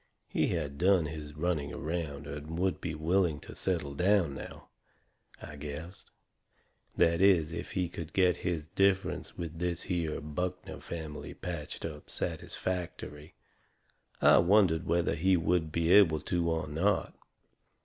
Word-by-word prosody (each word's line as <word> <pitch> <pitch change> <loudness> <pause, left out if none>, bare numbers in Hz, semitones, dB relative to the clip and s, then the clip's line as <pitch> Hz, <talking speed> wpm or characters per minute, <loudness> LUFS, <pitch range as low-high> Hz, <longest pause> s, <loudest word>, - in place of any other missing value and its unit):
He - - +1
had 70 -5 -2
done 90 -2 +4
his 75 -1 -7
running 75 -3 -1
around 75 -3 -4
and 75 +3 -6
would 95 +1 0
be 80 -3 -3
willing 80 0 +1
to - - -9
settle 85 -7 -2
down 90 -1 +3
now, - - -9 0.7
I 75 - -9
guessed. 75 +6 -8 0.9
That 85 +1 +4
is, 90 -5 +5
if - - -6
he 90 -2 0
could 85 -2 -7
get 90 -2 +3
his 85 -4 -2
differences 95 +2 +1
with 85 -1 -5
this 90 0 -2
here 85 -4 -1
Buckner 80 +4 -4
family 80 -3 -7
patched 85 -5 -5
up 75 -2 -7
satisfactory. 85 -4 -4 0.8
I - - +7
wondered 90 -3 +4
whether 85 0 +2
he 95 +3 +3
would 80 -1 +1
be 85 +1 +1
able 85 -7 +6
to 85 +1 0
or 80 -1 -1
not. 95 +7 0
85 Hz, 140 wpm, -31 LUFS, 75-90 Hz, 0.9 s, I